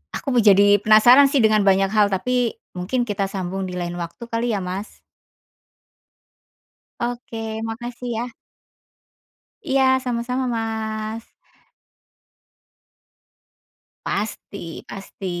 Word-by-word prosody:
aku 275 - -3
mau 235 - +5
jadi 205 0 +6
penasaran 240 +7 +7
sih 270 -4 +2
dengan 215 -2 +3
banyak 195 0 +3
hal, 210 -2 +4
tapi 245 +5 0 0.2
mungkin 240 +8 -1
kita 200 -3 -2
sambung 190 0 -4
di 180 - -6
lain 175 0 -4
waktu 170 +7 -7
kali 230 -1 0
ya 195 - -3
Mas. 190 +4 -6 2.0
Oke 240 -2 -4 0.2
makasih 240 +2 -6
ya. 240 - -2 1.4
Iya, 270 -4 +2 0.2
sama-sama 250 +1 -2
Mas. 220 0 -4 2.8
Pasti 200 -4 -5
pasti. 195 0 -9
215 Hz, 100 wpm, -22 LUFS, 195-240 Hz, 2.8 s, penasaran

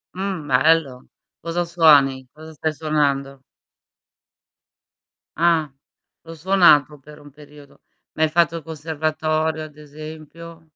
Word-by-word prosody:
Mh, 190 -5 -4
bello. 135 -1 +1 0.3
Cosa 170 +1 -3
suoni? 145 -6 +3
Cosa 155 +1 -13
stai 155 +1 -3
suonando? 140 -3 -2 2.0
Ah. 165 -3 +1 0.5
L'ho 165 0 -10
suonato 155 -5 +3
per 150 +2 -15
un 145 -1 -16
periodo. 145 0 -17 0.3
Ma 160 - -1
hai 160 - +2
fatto 165 0 +1
conservatorio 155 0 -3
ad 155 -1 -12
esempio? 155 +2 -12
155 Hz, 105 wpm, -21 LUFS, 145-165 Hz, 2.0 s, suoni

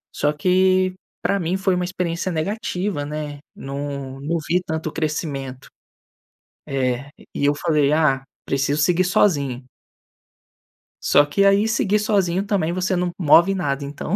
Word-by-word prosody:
só 150 +1 +1
que 185 +3 +2 0.3
pra 200 0 +1
mim 175 +2 -1
foi 190 -1 +1
uma 180 0 -1
experiência 180 0 -2
negativa, 180 -1 -2
né, 150 -1 -5 0.2
não 140 -1 -6
não 165 +4 -1
vi 180 +2 +2
tanto 160 -1 -3
crescimento. 140 -4 -4 1.0
Eh, 130 0 -1 0.3
e 140 - 0
eu 145 - +3
falei: 150 -1 +1
"Ah, 150 -4 +2 0.2
preciso 140 +2 0
seguir 180 +4 +3
sozinho." 140 -9 +1 1.4
Só 145 - +5
que, 195 +7 +1
aí, 200 +2 +4
seguir 210 -2 +1
sozinho, 195 -3 +1
também, 185 -5 0
você 185 +1 0
não 180 0 0
move 170 +3 +5
nada. 145 -7 -2
Então 145 +6 -4
160 Hz, 140 wpm, -21 LUFS, 145-185 Hz, 1.4 s, Só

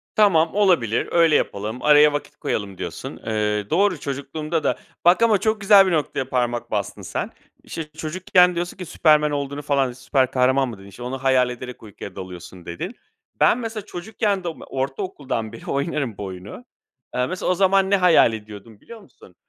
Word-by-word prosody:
"Tamam, 170 -6 +4
olabilir, 175 - +2
öyle 165 -3 +4
yapalım, 110 +3 -2
araya 150 0 +6
vakit 145 - -5
koyalım." 100 -3 -3
diyorsun. - - -6
Eee, 105 -2 -1
doğru, 185 0 +2
çocukluğumda 145 +4 -3
da - - +1 0.3
Bak 175 +5 +5
ama 220 -3 +5
çok 220 +2 -1
güzel 200 -1 +7
bir - - 0
noktaya 145 -4 -1
parmak 120 -2 -1
bastın 100 -3 -3
sen. - - -4 0.3
İşte, 165 - -5
çocukken 180 +2 +2
diyorsun 175 +1 -3
ki 185 - -6
Superman 150 -2 +3
olduğunu 140 0 -3
falan 140 -3 +1
süper 130 +1 0
kahraman 130 +1 +2
mı 115 - -8
dedin? 95 0 -14
İşte, 100 +5 -11
"Onu 130 +1 -5
hayal 130 -2 +3
ederek 125 0 -8
uykuya 100 -3 -10
dalıyorsun." 90 -1 -9
dedin. 85 - -6 0.4
Ben, - - +5
mesela, 225 -4 -5
çocukken 200 +1 -2
de - - -4
oma 165 - -6
ortaokuldan 135 - -4
beri 115 - -11
oynarım 140 - -2
bu - - -6
oyunu. 95 - -9 0.5
Eee, 125 - +1
mesela, 180 +4 -2
o - - +4
zaman 195 0 +3
ne 200 - +4
hayal 175 -10 +5
ediyordum 105 0 -10
biliyor 230 -1 -12
musun? - - -19
140 Hz, 180 wpm, -22 LUFS, 115-180 Hz, 0.5 s, güzel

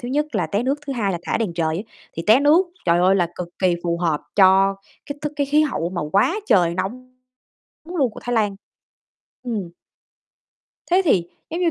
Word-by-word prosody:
thứ 245 - -6
nhất 295 +4 0
là - - 0
té 205 +3 -1
nước, 275 +3 0
thứ 275 - -2
hai 205 -6 -1
là 175 - -3
thả - - -1
đèn 200 -7 -2
trời 160 -1 0
á. 195 - -3 0.3
Thì 165 - -4
té 225 +6 +6
nước, 315 +6 +4 0.2
trời 170 0 +4
ơi, 185 +2 +4
là 175 -3 +1
cực 175 -1 -5
kỳ 185 -2 +2
phù 170 0 0
hợp 165 -4 0 0.2
cho 195 0 +5 0.3
cái 285 0 -6
thức 295 0 -3
cái 285 -1 0
khí 300 +2 +3
hậu 180 - -2
mà 180 - -3
quá 205 - +3
trời 170 -2 +3
nóng 255 +7 -5 0.7
luôn 315 -8 0
của - - -10
Thái 245 - -3
Lan. 205 -3 +1 0.9
Ừm. 210 -8 -4 1.2
Thế 370 +2 +4
thì 185 - +3 0.3
giống 335 +3 -3
như, 340 -2 +2
210 Hz, 210 wpm, -21 LUFS, 180-280 Hz, 1.2 s, té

